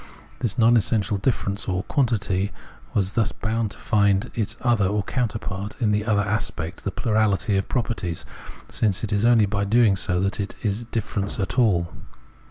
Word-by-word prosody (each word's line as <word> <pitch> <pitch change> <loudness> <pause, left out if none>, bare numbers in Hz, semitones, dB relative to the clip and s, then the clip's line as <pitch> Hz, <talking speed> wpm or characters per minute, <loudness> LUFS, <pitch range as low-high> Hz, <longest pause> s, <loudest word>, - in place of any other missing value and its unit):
This 115 -3 -1
non 120 0 +5
essential 105 -1 +1
difference, 100 -3 -1 0.2
quantity, 105 -7 0 0.4
was 100 -1 +1
thus 115 -1 +1
bound 110 0 -2
to - - -9
find 100 -2 +2
its 110 0 -2
other 115 -5 +2
or 105 +1 0
counterpart 105 -5 -3
in 110 -5 +2
the 105 0 0
other 105 -3 +2
aspect, 100 -5 -3
the - - -1
plurality 105 -1 +1
of 95 - -1
properties, 110 -9 -2 0.4
since 105 -2 0
it 105 -1 -1
is 100 +2 +2
only 120 -3 +5
by 100 0 -1
doing 110 0 +4
so 90 -1 0
that 95 +3 -1
it 100 - -3
is 110 +2 -1
difference 105 -3 -2
at 100 +6 -1
all. 90 -8 +2
105 Hz, 170 wpm, -24 LUFS, 100-115 Hz, 0.4 s, non